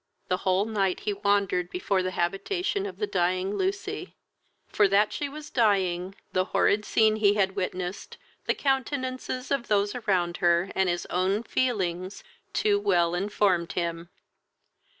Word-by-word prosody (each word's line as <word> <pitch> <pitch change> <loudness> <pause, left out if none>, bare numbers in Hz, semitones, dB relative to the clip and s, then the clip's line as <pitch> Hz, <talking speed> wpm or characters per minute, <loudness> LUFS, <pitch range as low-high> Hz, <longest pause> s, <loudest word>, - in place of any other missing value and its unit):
The 185 - +2
whole 190 +1 +1
night 195 -4 0
he 210 - -1
wandered 200 -3 +1
before 185 +1 0
the 185 - -1
habitation 360 - -1
of 395 - -8
the 420 - 0
dying 185 - 0
Lucy, 390 - -3 0.5
for 205 - +3
that 200 +2 +3
she 290 - -3
was 300 +1 -9
dying 190 -5 +1 0.2
the 185 0 +2
horrid 210 +2 +2
scene 215 -1 +3
he 205 -1 +4
had 195 -2 +1
witnessed, 185 +1 -4 0.3
the - - +2
countenances 260 -1 -2
of 275 -4 0
those 205 -1 +2
around 185 -7 0
her, 175 +2 +2
and 190 -1 +1
his 175 0 -1
own 190 +4 +1
feelings, 190 -8 -1 0.3
too 205 -1 +2
well 175 -4 +2
informed 185 -2 +1
him. 170 -1 -3
200 Hz, 150 wpm, -27 LUFS, 180-220 Hz, 0.5 s, he